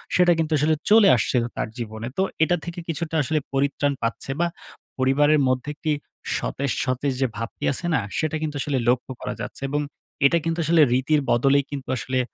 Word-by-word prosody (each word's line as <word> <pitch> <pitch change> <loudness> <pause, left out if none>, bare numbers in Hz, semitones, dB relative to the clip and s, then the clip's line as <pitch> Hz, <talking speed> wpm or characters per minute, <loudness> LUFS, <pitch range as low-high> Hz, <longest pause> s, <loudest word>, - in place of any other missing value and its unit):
সেটা 180 -1 +5
কিন্তু 160 0 0
আসলে 155 +2 +2
চলে 215 0 +7
আসছিল 120 +1 +1
তার - - -1
জীবনে। 110 -1 -5
তো - - +2 0.2
এটা 175 +2 +3
থেকে 175 0 -6
কিছুটা 165 +1 -3
আসলে 155 +3 0
পরিত্রাণ 140 +1 +1
পাচ্ছে 115 +3 -2
বা, 175 - +3 0.5
পরিবারের 145 +3 +4
মধ্যে 130 +2 0
একটি 155 0 -2 0.5
সতেজ, 140 -1 -2
সতেজ 130 +1 0
যে 130 - +3
ভাবটি 115 0 -6
আছে 140 - -3
না? - - +3 0.2
সেটা 155 0 0
কিন্তু 155 -2 -3
আসলে 140 -2 -1
লক্ষ্য 125 +1 0
করা - - -3
যাচ্ছে - - -7
এবং 145 +1 0 0.4
এটা 155 +5 +5
কিন্তু 165 +1 -1
আসলে 165 +1 +4
রীতির 145 +4 +2
বদলেই 135 +4 +4
কিন্তু 140 -3 -6
আসলে 130 +1 -1
140 Hz, 185 wpm, -23 LUFS, 130-155 Hz, 0.5 s, চলে